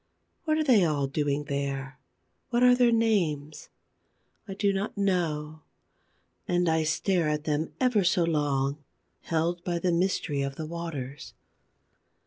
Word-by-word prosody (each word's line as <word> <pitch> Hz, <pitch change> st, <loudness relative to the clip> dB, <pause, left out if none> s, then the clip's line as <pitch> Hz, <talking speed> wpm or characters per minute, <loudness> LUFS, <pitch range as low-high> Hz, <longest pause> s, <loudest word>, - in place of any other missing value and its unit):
What 310 Hz, -1 st, +2 dB
are 315 Hz, -, +2 dB
they 245 Hz, -10 st, +5 dB
all 150 Hz, -4 st, +1 dB
doing 145 Hz, +1 st, -1 dB
there? 140 Hz, -2 st, -4 dB, 0.5 s
What 240 Hz, -1 st, +2 dB
are 250 Hz, 0 st, +7 dB
their 245 Hz, -1 st, +4 dB
names? 175 Hz, -11 st, 0 dB, 0.8 s
I 195 Hz, -, -6 dB
do 200 Hz, 0 st, +1 dB
not 195 Hz, +2 st, -3 dB
know. 160 Hz, -6 st, -1 dB, 0.9 s
And 175 Hz, 0 st, +1 dB
I 160 Hz, -1 st, +2 dB
stare 165 Hz, +1 st, +1 dB
at 150 Hz, 0 st, -1 dB
them 155 Hz, 0 st, -1 dB
for -, -, -25 dB
ever 245 Hz, -6 st, +3 dB
so 180 Hz, 0 st, +3 dB
long, 145 Hz, -3 st, 0 dB, 0.4 s
held 170 Hz, +1 st, -1 dB
by 175 Hz, -1 st, -1 dB
the 175 Hz, +1 st, 0 dB
mystery 170 Hz, -4 st, 0 dB
of 140 Hz, 0 st, -3 dB
the 160 Hz, -, -5 dB
waters. 155 Hz, -5 st, -6 dB
165 Hz, 145 wpm, -27 LUFS, 145-195 Hz, 0.9 s, are